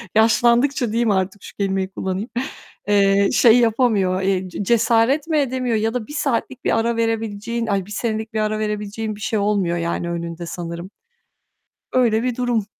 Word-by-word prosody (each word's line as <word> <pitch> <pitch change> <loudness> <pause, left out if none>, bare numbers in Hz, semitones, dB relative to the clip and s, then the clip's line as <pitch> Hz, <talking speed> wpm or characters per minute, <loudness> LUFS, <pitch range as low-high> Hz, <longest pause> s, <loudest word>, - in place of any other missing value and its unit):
yaşlandıkça 235 +3 +3
diyeyim 230 -1 +1
artık 190 0 -1
şu - - -11
kelimeyi 195 -1 -1
kullanayım, 190 +4 -4 0.6
eee, 200 -1 +4
şey 235 0 +6
yapamıyor, 215 -6 +2
eee, 190 -1 0
ce 190 - -4
cesaret 235 +7 +2
mi 315 -2 +1
edemiyor 255 -4 0
ya 220 +1 0
da 240 -4 -3
1 - - -9
saatlik 265 -2 -2
bir - - +2
ara 235 +1 0
verebileceğin, 225 0 -2
ay, 195 -3 0
1 210 - -13
senelik 220 0 -3
bir 220 - -1
ara 215 0 0
verebileceğin 210 0 -3
bir 205 - -13
şey 220 0 -1
olmuyor 200 -4 +1
yani 170 0 -2
önünde 170 0 -5
sanırım. 170 +1 -6 1.0
Öyle 235 -3 +2
bir 250 -2 -1
durum. 240 -4 0
215 Hz, 170 wpm, -21 LUFS, 195-235 Hz, 1.0 s, şey